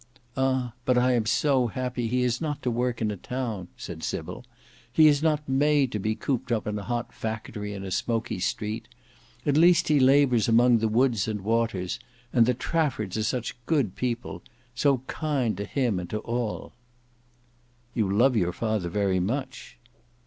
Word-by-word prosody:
"Ah! 130 -3 0
but 125 0 +2
I 125 +1 +4
am 115 -3 +1
so 130 -1 +2
happy 125 +1 -3
that - - -6
he 125 0 +2
has 125 +2 0
not 150 -3 -3
to 125 - 0
work 120 0 -1
in 105 - 0
a 105 - -5
town," 115 -4 -4
said - - -7
Sybil. - - -4 0.5
"He 155 +5 +6
is 145 -1 +4
not 150 -2 +1
made 140 0 +2
to 105 - -2
be 110 +2 -1
cooped 125 0 -2
up 110 -3 0
in 105 0 -2
a - - -7
hot 120 +1 -3
factory 105 -2 -5
in 100 - -6
a 95 - -6
smoky 115 0 -1
street. 105 +4 -3 0.6
At 145 0 +2
least 175 +1 +5
he 150 -2 +4
labours 130 -4 +4
among 120 +1 +5
the 110 - +1
woods 115 -2 +2
and 105 -2 -3
waters. 110 -4 -1 0.3
And 120 -3 +5
the 125 - +2
Traffords 130 - -1
are 110 - 0
such 120 +2 -3
good 135 - +1
people! 120 +2 -3 0.3
So 130 0 +2
kind 135 -10 -1
to 100 - -3
him 120 -4 0
and 90 - -6
to 110 - -2
all." 115 -1 -3 1.2
"You 110 -5 0
love 120 +6 +4
your 90 -5 +1
father 110 -5 -1
very 95 0 +1
much." 130 +8 -4
120 Hz, 185 wpm, -26 LUFS, 110-130 Hz, 1.2 s, He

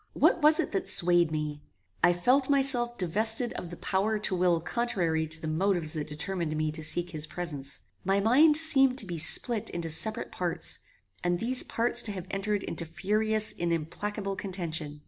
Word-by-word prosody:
What 340 - +2
was 305 +1 +5
it - - -2
that 195 - 0
swayed 175 -2 +4
me? 150 -1 -5 0.4
I 175 - +5
felt 255 +11 +1
myself 260 -4 +1
divested 220 +7 +1
of 175 - -7
the 175 - -10
power 205 +3 -1
to 210 -2 -1
will 175 -2 +1
contrary 170 -6 -2
to 160 +1 -1
the 160 - -6
motives 170 0 -1
that 150 -2 -5
determined 155 +1 -4
me 155 0 -2
to 160 +1 -7
seek 175 +3 +2
his 155 -2 -3
presence. 145 -6 -4 0.2
My 195 +1 0
mind 285 +9 +4
seemed 270 -5 +6
to 220 - +2
be 175 -3 -6
split 220 +7 +2
into 170 -2 -4
separate 220 +8 -1
parts, 175 -2 0 0.4
and 175 0 0
these 250 +6 +1
parts 240 +1 +3
to 215 - 0
have 185 -3 -7
entered 200 +1 -2
into - - -5
furious 215 +6 -2
and 170 0 -3
implacable 195 +5 -4
contention. 160 -6 -5
185 Hz, 185 wpm, -27 LUFS, 165-220 Hz, 0.4 s, seemed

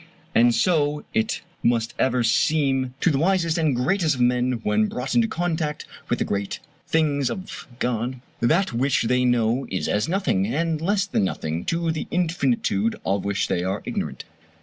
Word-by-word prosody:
And 120 0 +5
so 150 -4 +1
it 220 +1 0 0.2
must 115 -1 +1
ever 125 -2 +2
seem 135 +1 +1
to 175 - +3
the 135 - +1
wisest 170 -1 +2
and 155 -5 +2
greatest 160 +4 +1
of 125 - -3
men 125 +1 +2
when 105 +1 +2
brought 125 +4 -4
into 235 -1 +3
contact 160 -5 -2 0.2
with - - +1
the - - -1
great 100 -1 -3 0.3
things 145 -5 +1
of 190 0 -7
God 125 +1 -2 0.2
that 165 +10 +2
which 130 +3 +1
they 125 +2 +2
know 120 +1 +1
is 95 - -2
as 105 +9 0
nothing, 170 - +1
and 160 +5 -1
less 195 +3 +1
than 180 - 0
nothing, 80 -3 -2
to 165 0 0
the 160 - -4
infinitude 135 - 0
of 100 +1 0
which 100 0 0
they 90 - 0
are 95 +2 -2
ignorant. - - -4
135 Hz, 170 wpm, -24 LUFS, 115-165 Hz, 0.3 s, And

